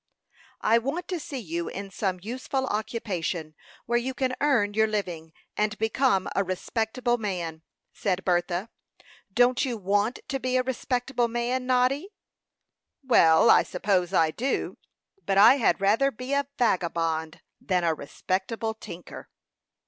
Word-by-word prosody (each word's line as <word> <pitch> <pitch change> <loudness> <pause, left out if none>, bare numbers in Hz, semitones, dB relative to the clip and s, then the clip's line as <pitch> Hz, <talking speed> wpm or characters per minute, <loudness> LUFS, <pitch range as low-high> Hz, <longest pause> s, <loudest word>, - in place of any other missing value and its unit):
"I 230 +2 +4
want 285 +9 -3
to 360 -3 -2
see 290 -2 -6
you 170 -7 -4
in 195 +1 -6
some 190 -2 -2
useful 260 +4 -3
occupation, 200 -8 -3 0.3
where 240 0 +2
you 260 +2 -4
can 255 -1 0
earn 235 -9 +2
your 220 +1 +3
living, 175 -7 -3 0.2
and 210 0 0
become 220 -2 +1
a 200 - +2
respectable 225 +6 -1
man," 175 -6 -4 0.3
said 190 -3 -2
Bertha. 175 +3 0 0.6
"Don't 245 +5 +3
you 250 -4 -2
want 205 +4 0
to 275 -2 -2
be 255 0 0
a 255 - +2
respectable 250 -1 -1
man, 240 +2 -2
Noddy?" 260 +7 +2 0.9
"Well, 165 -11 +6
I - - +7
suppose 180 -1 0
I 165 -4 +3
do; 255 - -2 0.4
but 195 - 0
I 215 +7 +8
had 235 - +2
rather 215 +8 +3
be 255 +2 -5
a 280 -1 +1
vagabond 165 -6 0 0.2
than 180 -2 0
a 165 -1 +2
respectable 190 +9 -3
tinker." 175 -5 -10
220 Hz, 140 wpm, -26 LUFS, 185-255 Hz, 0.9 s, I